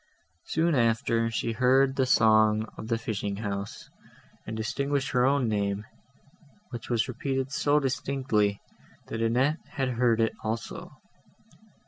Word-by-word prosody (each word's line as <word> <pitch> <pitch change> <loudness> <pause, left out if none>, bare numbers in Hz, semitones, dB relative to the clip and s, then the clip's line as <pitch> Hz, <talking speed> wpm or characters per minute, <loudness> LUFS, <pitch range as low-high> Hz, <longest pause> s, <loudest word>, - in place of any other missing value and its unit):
Soon 165 +1 +1
after, 115 -2 +2
she 115 0 -2
heard 130 +3 +3
the 130 -2 +1
song 110 -2 +4
of 110 - -8
the 115 0 0
fishing 105 -3 -3
house, 100 -1 -5 0.6
and 110 0 -4
distinguished 140 +5 -1
her 125 0 +3
own 140 -3 +2
name, 100 -1 -1 0.9
which 120 -2 -7
was 120 +2 +1
repeated 135 +1 -3
so 145 +1 +2
distinctly, 130 -7 0 0.5
that 115 - -3
Annette 130 +7 +2
had 135 -3 -2
heard 120 -2 +2
it 115 0 +2
also. 110 +1 -4
115 Hz, 130 wpm, -27 LUFS, 110-135 Hz, 0.9 s, song